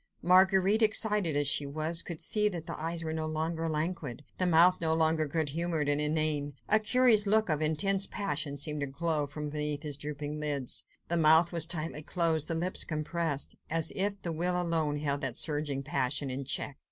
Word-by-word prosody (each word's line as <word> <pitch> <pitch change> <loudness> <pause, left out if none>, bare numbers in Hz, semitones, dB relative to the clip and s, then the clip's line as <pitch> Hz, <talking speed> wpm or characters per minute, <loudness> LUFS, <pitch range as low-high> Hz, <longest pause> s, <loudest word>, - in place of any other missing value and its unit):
Marguerite, 190 +4 +4
excited, 210 -6 +4
as 145 0 +1
she 140 0 +2
was, 155 +3 +1
could 170 -2 -5
see 210 -1 +3
that 170 -5 -7
the - - -6
eyes 165 +1 -4
were 160 0 -4
no 160 0 -3
longer 160 +1 -3
languid, 155 -4 -4 0.2
the 185 - +2
mouth 175 +2 +4
no 160 -1 +2
longer 160 -1 +1
good 155 0 -2
humoured 165 0 -1
and 145 0 +2
inane. 150 -1 +1
A 215 - +4
curious 220 -2 +3
look 220 0 +2
of 155 -1 0
intense 190 +6 +2
passion 150 -7 -3
seemed 150 +1 -2
to 140 - -2
glow 150 +1 -2
from 150 +1 -6
beneath 150 0 -3
his 145 -2 -4
drooping 150 +1 -6
lids, 145 -4 -1 0.2
the 170 - 0
mouth 160 +1 +4
was 170 -2 +2
tightly 160 -2 -2
closed, 160 -1 0
the 165 - -2
lips 175 +3 +2
compressed, 155 -1 -3
as 165 0 0
if 200 +1 0
the 170 - -3
will 180 +2 -1
alone 160 -4 -1
held 145 -1 -2
that 130 -4 -3
surging 145 -3 -1
passion 135 0 -2
in 135 +1 -5
check. 135 +1 -3
160 Hz, 195 wpm, -29 LUFS, 150-175 Hz, 0.2 s, Marguerite